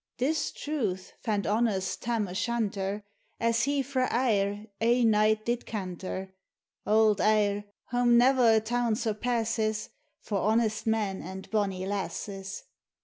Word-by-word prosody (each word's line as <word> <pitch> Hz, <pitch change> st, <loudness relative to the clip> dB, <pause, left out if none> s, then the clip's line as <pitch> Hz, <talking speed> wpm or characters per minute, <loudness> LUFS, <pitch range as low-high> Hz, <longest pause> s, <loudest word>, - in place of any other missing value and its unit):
71 260 Hz, +5 st, +2 dB
This 320 Hz, -, -1 dB
truth 215 Hz, -12 st, -3 dB
fand 210 Hz, -4 st, 0 dB
honest 205 Hz, -3 st, 0 dB
Tarn 230 Hz, -3 st, -1 dB
O' 180 Hz, -, -7 dB
Shanter, 205 Hz, -2 st, -1 dB, 0.4 s
As 230 Hz, +1 st, +2 dB
he 280 Hz, -1 st, +1 dB
frae 260 Hz, -1 st, 0 dB
Ayr 210 Hz, -4 st, +1 dB, 0.2 s
ae 240 Hz, +2 st, +3 dB
night 215 Hz, 0 st, +3 dB
did 240 Hz, 0 st, -2 dB
canter 190 Hz, -1 st, -5 dB, 0.5 s
(Auld 215 Hz, -1 st, +4 dB
Ayr, 205 Hz, -1 st, +2 dB, 0.3 s
wham 245 Hz, -1 st, +4 dB
ne'er 245 Hz, -2 st, +5 dB
a -, -, +5 dB
town 235 Hz, +1 st, 0 dB
surpasses, 220 Hz, -1 st, -1 dB, 0.3 s
For 205 Hz, -3 st, -2 dB
honest 220 Hz, +2 st, +1 dB
men 210 Hz, -4 st, 0 dB
and 190 Hz, +2 st, -8 dB
bonnie 195 Hz, -4 st, 0 dB
lasses). 195 Hz, 0 st, -4 dB
215 Hz, 135 wpm, -28 LUFS, 200-235 Hz, 0.5 s, ne'er